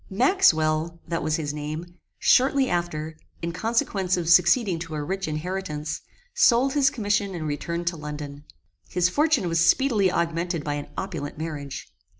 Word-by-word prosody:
Maxwell, 170 - +2
that 165 0 -2
was 155 0 0
his 150 -3 -3
name, 150 +3 -5 0.3
shortly 265 +1 +4
after, 160 -4 -2 0.3
in 170 - -1
consequence 195 -1 0
of 170 -2 -3
succeeding 180 +2 +4
to 165 -2 -6
a 150 - -3
rich 190 +4 -3
inheritance, 155 -1 -4 0.3
sold 255 +3 +4
his 280 -2 +4
commission 205 -6 -1
and 160 -2 -4
returned 170 +4 -3
to 170 -1 -1
London. 145 -1 -7 0.5
His 180 0 +2
fortune 295 - +2
was 165 -1 +2
speedily 215 -3 +3
augmented 170 -1 -1
by 145 - -2
an 145 0 -5
opulent 165 -8 -5
marriage. 150 -3 -6
170 Hz, 155 wpm, -25 LUFS, 155-195 Hz, 0.5 s, shortly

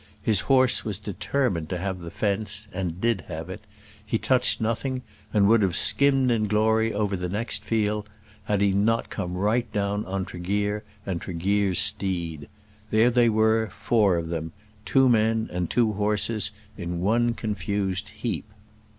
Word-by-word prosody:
His 110 -4 +3
horse 130 +1 +3
was 105 -4 -3
determined 100 - -2
to 90 - -2
have 95 +1 -3
the 85 -1 -7
fence, 105 +2 -2
and 90 -2 -3
did 115 -3 +1
have 80 +1 -6
it. - - -8 0.4
He - - -1
touched - - +2
nothing, 125 +3 -2 0.3
and 100 -3 +4
would 115 +1 +5
have 95 -3 +1
skimmed 130 +5 +3
in 110 -2 +1
glory 110 +2 +2
over 105 -1 -1
the 90 -1 -3
next 105 +5 -3
field 105 -1 -1 0.4
had 105 -2 0
he 100 -1 +4
not 105 +4 +1
come 90 0 -4
right 105 +6 0
down 100 0 -1
on 95 0 -2
Tregear 100 +4 -2 0.2
and 90 -3 -3
Tregear's 95 +2 0
steed. 85 -8 0 0.4
There 110 +3 +4
they 120 -1 +4
were, 110 0 +2
four 105 -7 +2
of 80 -1 -3
them, 80 -1 -4 0.3
two 135 -1 +4
men 110 -1 +2
and 90 -1 -2
two 115 -2 +2
horses 105 +1 0 0.3
in 85 -1 -3
one 115 +4 +2
confused 100 -3 -2
heap. - - -4
105 Hz, 160 wpm, -25 LUFS, 95-110 Hz, 0.4 s, would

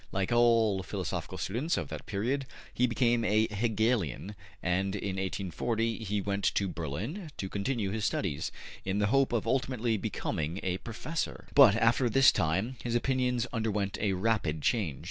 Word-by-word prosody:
Like 95 +2 -1
all 115 -4 +4
philosophical 90 - -4
students 130 - -1
of - - -3
that - - -7
period, 120 +6 -1 0.3
he 125 - +2
became 120 -1 +2
a 110 +1 +3
Hegelian, 105 - 0 0.3
and 95 +2 0
in 100 -1 -3
1840 105 +4 -1
he 105 -1 -1
went 100 0 -2
to 100 - +1
Berlin 95 - -4
to 95 - -3
continue 100 +1 -2
his 110 0 -2
studies, 80 -8 -1 0.3
in 95 +1 -1
the 105 - +2
hope 135 -1 +3
of 120 -2 0
ultimately 125 -4 0
becoming 80 -2 -3
a 95 0 -1
professor. 150 +8 -4
But 130 -8 +8
after 115 +2 +3
this 135 +4 +6
time 95 +8 0
his 120 -1 -1
opinions 125 -1 +1
underwent 105 -4 -1
a 100 -2 +1
rapid 90 -7 0
change. 90 - 0
110 Hz, 160 wpm, -30 LUFS, 95-120 Hz, 0.3 s, But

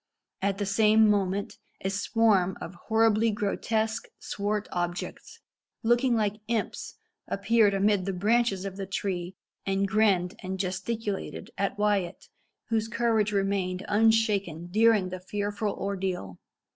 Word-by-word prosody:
At 195 0 0
the 205 - -1
same 215 +2 +4
moment 200 -1 0 0.2
a 190 - -1
swarm 200 -2 +2
of 170 - -7
horribly 225 0 +3
grotesque, 220 +2 -1
swart 205 +1 -3
objects, 175 - -4 0.4
looking 240 +2 +3
like 210 -1 -1
imps, 230 -2 -3 0.3
appeared 220 -4 +3
amid 200 -1 +2
the 195 - -1
branches 205 0 +1
of 195 -1 -6
the 195 -1 -5
tree, 185 -2 -3 0.3
and 195 0 0
grinned 195 -3 +2
and 190 +1 -4
gesticulated 195 +3 -3
at 200 0 -1
Wyat, 205 -4 0 0.4
whose 225 -1 +1
courage 225 -2 +1
remained 195 -2 -1
unshaken 205 -6 +2
during 215 -2 +4
the 185 0 -6
fearful 205 +2 -2
ordeal. 190 - -3
205 Hz, 125 wpm, -27 LUFS, 190-220 Hz, 0.4 s, same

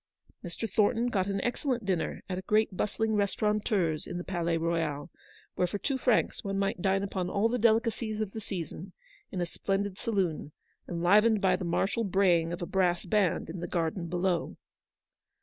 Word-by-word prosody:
Mr. 175 +6 -4
Thornton 225 +4 +2
got 195 -5 0
an 195 -1 -1
excellent 245 -2 -1
dinner 185 -4 -1
at 185 -1 -3
a 190 - -11
great 215 -2 +2
bustling 220 +3 0
restaurateur's 205 -5 +1
in 175 - -4
the 175 - -4
Palais 170 -3 -1
Royal, 165 -2 -1 0.4
where 180 - +1
for 205 - -3
two 265 +5 -2
francs 245 -3 +1
one 195 -1 -2
might 195 -2 -1
dine 195 +1 +2
upon 185 -2 -2
all 200 +3 +2
the 245 +2 -1
delica 230 +1 +4
cies 215 -2 -4
of 215 -3 -2
the 220 - -6
season, 180 -1 -6 0.4
in 185 - -3
a - - +1
splendid 195 +2 -2
saloon, 185 -10 -1 0.4
enlivened 205 +6 +4
by 190 -2 +3
the 185 - -4
martial 195 +6 0
braying 180 -4 +3
of 175 +1 -4
a - - -1
brass 180 -1 +1
band 205 -5 +1
in 170 +2 -6
the 175 - -4
garden 170 0 -1
below. 175 0 -1
195 Hz, 185 wpm, -29 LUFS, 175-215 Hz, 0.4 s, delica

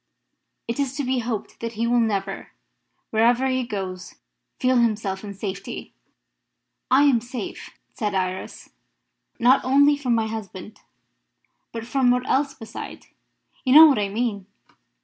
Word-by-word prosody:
It 230 +4 -3
is 275 -1 -1
to 290 - -1
be 260 0 0
hoped 225 -3 -5
that 230 0 -5
he 225 +1 -1
will 240 +1 +2
never, 200 -4 -2 0.6
wherever 235 +4 +3
he 260 -1 0
goes, 190 -6 -6 0.4
feel 255 -1 +2
himself 215 -4 0
in 200 -1 -7
safety." 195 0 -6 1.0
"I 265 +3 +5
am 265 -5 +4
safe," 245 -2 -7 0.2
said 210 -4 -2
Iris, 185 0 -4 0.7
"not 250 +3 +4
only 285 +3 +4
from 255 -5 0
my 225 -1 +1
husband, 215 -2 -7 0.9
but 230 -1 -6
from 255 +1 +2
what 250 +1 +1
else 275 +1 +1
beside? 225 -3 -9 0.6
You 260 0 +3
know 315 +1 +12
what 285 -7 +4
I 200 -1 -1
mean. 205 -2 -2
230 Hz, 145 wpm, -23 LUFS, 205-255 Hz, 1.0 s, know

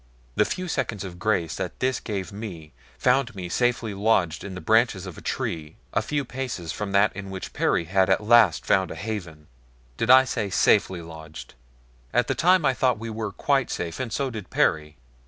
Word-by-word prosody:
The 105 - +3
few 185 0 -3
seconds 105 - -2
of 90 -2 -8
grace 90 -7 0
that 95 -3 -5
this 130 -1 0
gave 95 -5 -4
me 90 -7 -8 0.2
found 125 -2 +2
me 90 -2 -6
safely 120 0 0
lodged 95 -5 +1
in 95 -2 -7
the - - -5
branches 110 -3 +2
of 90 -3 -8
a - - -11
tree 75 -2 -3 0.2
a - - +2
few 145 -2 -2
paces 125 - -4
from 105 -1 -4
that 100 0 +3
in 100 0 -7
which 95 -1 -7
Perry - - +1
had 95 +2 +2
at - - +2
last 105 - +5
found 95 -3 +2
a - - -6
haven. 90 -7 -6 0.5
Did 115 - -1
I 130 +1 +9
say 115 -6 -2
safely 90 -1 +2
lodged? 80 -5 -10 0.6
At 120 0 +3
the - - 0
time 180 -1 +3
I 135 - +4
thought 125 -2 +1
we 115 +1 -6
were 110 -1 -4
quite 135 +4 +1
safe, 85 -1 -4
and 125 -3 -3
so 135 +1 -1
did 105 -6 -7
Perry. 75 -1 +1
100 Hz, 200 wpm, -25 LUFS, 90-120 Hz, 0.6 s, I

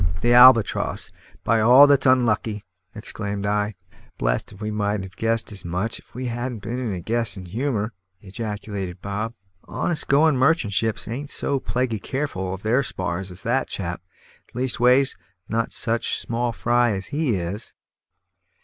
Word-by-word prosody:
"The 120 0 +3
Albatross, 125 -3 +5 0.3
by 115 -1 +2
all 125 +6 +8
that's 140 -2 +4
unlucky!" 115 -4 +2 0.3
exclaimed 100 -2 -4
I. 105 0 0 0.4
"Blest - - -1
if 95 - -14
we 110 0 -3
mightn't 105 -1 -1
have 95 -1 -10
guessed 115 0 -1
as 100 -3 -7
much 90 +6 -2
if - - -23
we'd 125 -1 -3 0.3
been 115 +5 -4
in 120 -4 -2
a 90 -2 -4
guessin' 110 -2 -1
humour," 110 +2 -2 0.3
ejaculated 100 -2 -5
Bob. 105 +4 -4 0.3
"Honest 170 -4 -2
going 150 +1 +4
merchant 130 -5 +2
ships 110 +1 0
ain't 135 +6 -5
so 140 -2 -1
plaguy 125 -4 -1
careful 130 -8 -3
of 95 +1 -6
their 120 +5 +3
spars 95 -6 -4
as 90 0 -10
that 125 +4 0
chap 85 -3 -4 0.5
leastways, 125 +1 +3 0.3
not 115 +1 -1
such 115 -1 -1
small 120 +1 -2
fry 120 0 +2
as 95 -1 -4
he 145 -7 +1
is. 95 +5 -4
115 Hz, 150 wpm, -23 LUFS, 100-125 Hz, 0.5 s, all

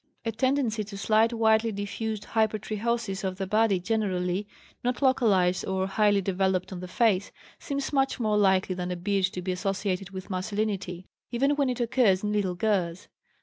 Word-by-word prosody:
A 225 - 0
tendency 245 -2 0
to 200 -1 -8
slight 220 +3 +3
widely 225 -1 +3
diffused 210 +1 -4
hypertrichosis 215 -1 -1
of 185 -1 -2
the 195 - -2
body 210 -1 +2
generally, 185 -2 -1 0.4
not 245 0 0
localized 200 -9 +3
or 190 0 0
highly 205 +1 +2
developed 190 0 0
on 180 - -6
the 180 - -6
face, 200 -1 +1 0.3
seems 280 -1 -3
much 270 -1 +1
more 215 -3 +1
likely 190 -2 +3
than 180 0 -4
a 180 - -2
beard 195 +2 +1
to 180 -1 -5
be 185 - -1
associated 195 0 -2
with 190 0 -8
masculinity, 190 -1 -2 0.2
even 265 +4 +1
when 280 -2 +1
it 250 - -2
occurs 235 -6 +2
in 210 0 -1
little 195 -4 0
girls. 180 -3 -1
205 Hz, 170 wpm, -27 LUFS, 185-225 Hz, 0.4 s, slight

